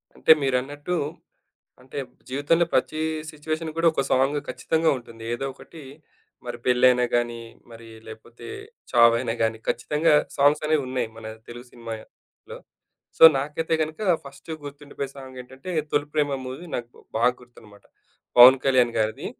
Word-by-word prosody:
అంటే, - - +3
మీరన్నట్టు, 140 +5 -2 0.9
అంటే, 130 +3 -9 0.3
జీవితంలో 145 +6 +2
ప్రతి 155 - 0 0.3
సిట్యుయేషన్ 155 +2 -4
కూడా, 165 0 +1
ఒక 140 - 0
సాంగు 135 +3 +2
ఖచ్చితంగా 160 0 0
ఉంటుంది. 115 -2 -13
ఏదో 120 - -5
ఒకటి 160 +3 -14 0.6
మరి 120 -1 -5
పెళ్ళైనా 125 0 +4
గానీ, 120 -1 -2 0.3
మరి 115 0 -12 0.2
లేకపోతే 110 +2 -12 0.5
చావైనా 115 -1 +4
గాని 110 0 0
ఖచ్చితంగా 150 +6 +1 0.2
సాంగ్సనేవున్నాయి 140 -4 +1
మన 115 -1 -9 0.2
తెలుగు 120 +1 -10
సినిమల్లో. 115 -2 -11 0.6
సో, - - -1 0.2
నాకైతే 150 +4 -2
గనుక 155 +3 -5 0.2
ఫస్టు 140 +3 -10
గుర్తుండిపోయే 145 -1 -7
సాంగేంటంటే, 130 +3 -10 0.2
'తొలి 145 0 0
ప్రేమా' 145 -3 0
మూవీ 130 +7 -7
నాకు 120 0 -7 0.2
బాగా 120 +2 +3
గుర్తనమాట. 110 -4 -18 0.5
పవన్ 130 +2 +10
కళ్యాణ్ 125 -3 +3
గారిది. 110 0 -1
130 Hz, 125 wpm, -24 LUFS, 120-150 Hz, 0.9 s, పవన్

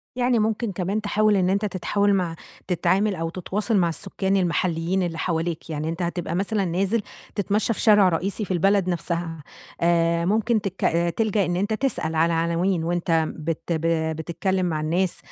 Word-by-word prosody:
يعني 245 -1 +2
ممكن 220 +1 0
كمان 195 +3 -2
تحاول 210 0 +2
إن 185 -1 +2
أنت 200 +2 +1
تتحاول 200 +1 +1
مع 175 -4 0 0.3
تتعامل 190 +3 +1
أو 165 -1 -3
تتواصل 200 +5 -1
مع 175 -3 +3
السكان 190 +4 -1
المحلّيين 175 0 0
اللي 165 -2 -3
حواليك، 165 -1 -2
يعني 155 0 -3
أنت 165 +2 -4
هتبقى 175 -1 -2
مثلًا 200 +1 0
نازل 195 +6 0 0.3
تتمشى 210 +3 +1
في - - -8
شارع 205 -4 +6
رئيسي 190 +5 -2
في - - -7
البلد 195 +1 +2
نفْسها، 170 -2 -3 0.4
آآ 170 0 +2
ممكن 220 +3 +2
تك 195 -1 -5 0.4
تلجأ 215 -3 +2
إن 175 - -1
أنت 205 +4 0
تسأل 215 -10 -1
على 165 +1 +3
عناوين، 170 +2 +1
وأنت 170 -1 +1
بت 160 0 -3 0.6
بتتكلّم 185 +3 -1
مع 155 -3 -1
الناس، 175 +4 0
185 Hz, 165 wpm, -24 LUFS, 170-205 Hz, 0.6 s, شارع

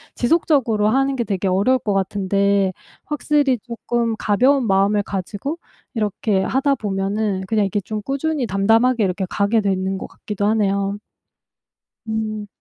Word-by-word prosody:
지속적으로 240 -7 +2
하는 270 +3 +2
게 235 - 0
되게 195 -2 -1
어려울 210 +8 +2
것 210 - -2
같은데 195 0 +1 0.3
확실히 295 -3 +1
쪼끔 235 -1 -2
가벼운 255 +5 +3
마음을 200 +2 +3
가지고 200 - -4 0.4
이렇게 210 -2 0
하다 275 +7 +1
보면은 200 -2 -1
그냥 215 -1 +2
이게 195 +1 -1
좀 215 +2 -5
꾸준히 275 +2 -1
담담하게 225 +5 +3
이렇게 190 +1 -1
가게 205 +3 +1
되는 190 -1 -1
것 - - -6
같기도 205 -1 -4
하네요. 200 -2 +1 1.1
음. 215 -1 -3
210 Hz, 315 characters per minute, -20 LUFS, 195-245 Hz, 1.1 s, 가벼운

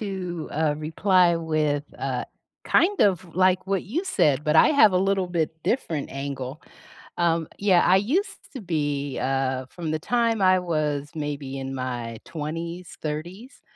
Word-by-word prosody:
to, 185 -5 -4
uh, 150 -1 +1
reply 175 +2 +3
with, 155 -3 0
uh, 130 -2 -2 0.4
kind 395 +4 +3
of 190 -5 +3
like 185 0 +3
what 195 -1 0
you 300 - -2
said, 150 - +2
but 150 - +2
I - - +7
have 220 -10 +6
a - - +2
little 195 -1 +1
bit 170 -3 -1
different 165 - -1
angle. 135 0 -5 0.6
Um, 165 -2 +1
yeah, 190 -3 +4
I 185 - +5
used 285 - -2
to 260 - -6
be, 145 -6 -2
uh, 130 -1 -1
from 165 +4 -6
the 155 - -1
time 230 +2 +1
I 185 -1 +5
was, 150 -4 -1
maybe, 145 -3 -4
in 135 0 -5
my 120 -3 -4
20s, 165 +3 -6
30s, 175 - -6
165 Hz, 155 wpm, -25 LUFS, 145-190 Hz, 0.6 s, I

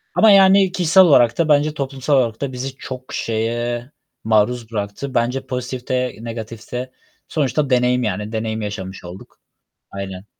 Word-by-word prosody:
Ama, 220 -1 +6
yani, 195 -1 +6
kişisel 185 0 +5
olarak 120 -8 +4
da 160 -2 +1
bence 150 +1 +3
toplumsal 140 0 -1
olarak 115 -2 0
da 140 -2 -2
bizi 130 +1 -5
çok 130 0 -8
şeye 120 +3 -2 0.3
maruz 110 +2 +1
bıraktı. 105 +6 -4
Bence 125 +3 0
pozitif 125 0 -5
de 125 -1 -1
negatif 115 -1 -8
de 125 +1 -4 0.4
sonuçta 145 -1 0
deneyim, 125 0 +2
yani, 105 +1 -3
deneyim 110 0 -3
yaşamış 95 -3 -6
olduk. 90 +2 -12 0.5
Aynen. 95 -1 -7
125 Hz, 150 wpm, -20 LUFS, 110-140 Hz, 0.5 s, Ama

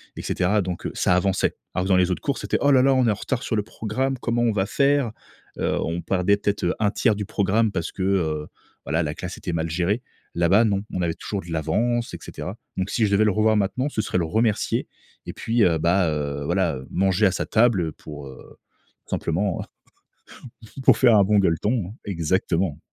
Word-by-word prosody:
et - - -6
cetera 100 +3 +1
donc 90 -2 -5
heu, - - -2
ça 90 - +2
avançait. 95 +1 +1 0.2
Alors 90 - -1
que - - -3
dans 95 - +5
les 90 0 +2
autres - - -2
cours, 140 - -1
c'était: - - -1
«Oh 145 - +4
là 130 -1 +5
là, 135 - +4
on 130 -2 +3
est 110 - +4
en - - 0
retard 125 +4 -3
sur 115 - -1
le 105 - 0
programme, 115 +5 -2
comment 120 -1 0
on 115 - +3
va 95 -2 +1
faire?», 140 -3 +2 0.5
heu, - - 0
on 85 +1 -2
perdait 95 +2 +1
peut 105 - +1
être, 100 - -8
heu, 85 - +1
1/3 105 +1 +2
du 105 -1 -4
programme 105 +1 +1
parce 85 -3 -3
que, 95 - -4
heu, 80 -6 0 0.4
voilà, 80 +1 0
la 75 -1 -3
classe 90 0 -6
était 90 - -4
mal 80 0 -1
gérée. 90 +8 0 0.4
Là-bas, 90 +6 +4
non, 100 -2 0
on 90 - -1
avait 85 -2 0
toujours 100 +2 -5
de 85 - -13
l'avance, 115 +10 0
et - - -4
cetera 95 +5 -7 0.2
donc 95 +1 -1
si 110 - +1
je 100 - -1
devais 100 +2 +4
le 105 - +3
revoir 110 +2 +2
maintenant, 105 +7 0
ce 110 - -1
serait 95 - -2
le 85 - +1
remercier 110 +4 0 0.4
et - - -5
puis, 115 -1 +1
heu, 85 -2 +3
bah, 85 +2 +2
heu, 70 -2 -3
voilà, - - +1
heu, 65 - -10
manger 95 +2 +2
à 95 - +4
sa - - -2
table 110 -8 +2
pour, 75 -2 -10
heu, 65 -1 -13 0.5
simplement, 90 +3 -1 1.2
pour - - +7
faire 120 -4 +6
un 100 - +6
bon 105 +1 +3
gueuleton. 100 +3 0
Exactement. 85 -2 -1
95 Hz, 220 wpm, -23 LUFS, 85-110 Hz, 1.2 s, pour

